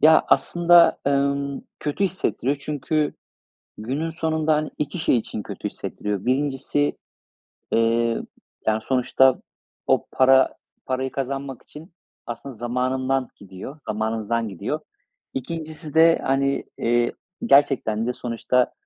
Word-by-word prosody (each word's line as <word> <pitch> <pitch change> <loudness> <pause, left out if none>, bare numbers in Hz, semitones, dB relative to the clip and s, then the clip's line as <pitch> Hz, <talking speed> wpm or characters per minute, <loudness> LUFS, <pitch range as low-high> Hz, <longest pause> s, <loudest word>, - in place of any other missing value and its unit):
Ya, 160 +1 +6
aslında, 175 0 +5
ımm, 140 0 0 0.2
kötü 150 +6 -1
hissettiriyor 145 -7 -1
çünkü 150 +1 -1 0.6
günün 135 +9 -2
sonunda, 160 -1 0
hani, 150 0 -2
2 150 +4 -3
şey 130 - +3
için 110 -1 -4
kötü - - -5
hissettiriyor. 105 -2 -4
1'incisi 140 +2 0 0.8
eee, 115 0 +2 0.5
yani, 110 0 +2
sonuçta 130 +1 +3 0.5
o - - +2
para 130 0 +5 0.3
parayı 130 0 -2
kazanmak 135 -1 -4
için 160 +3 -13 0.3
aslında 120 +3 -7
zamanından 130 +3 -1
gidiyor 100 +9 -10
zamanımızdan 110 +1 -1
gidiyor. 95 -4 -3 0.5
2'ncisi 155 +2 -6
de, 165 +1 +6
hani, 140 +1 +1
eee, 120 0 +2 0.3
gerçekten 130 - +3
de 125 - 0
sonuçta, 125 +1 0
135 Hz, 110 wpm, -23 LUFS, 120-150 Hz, 0.8 s, Ya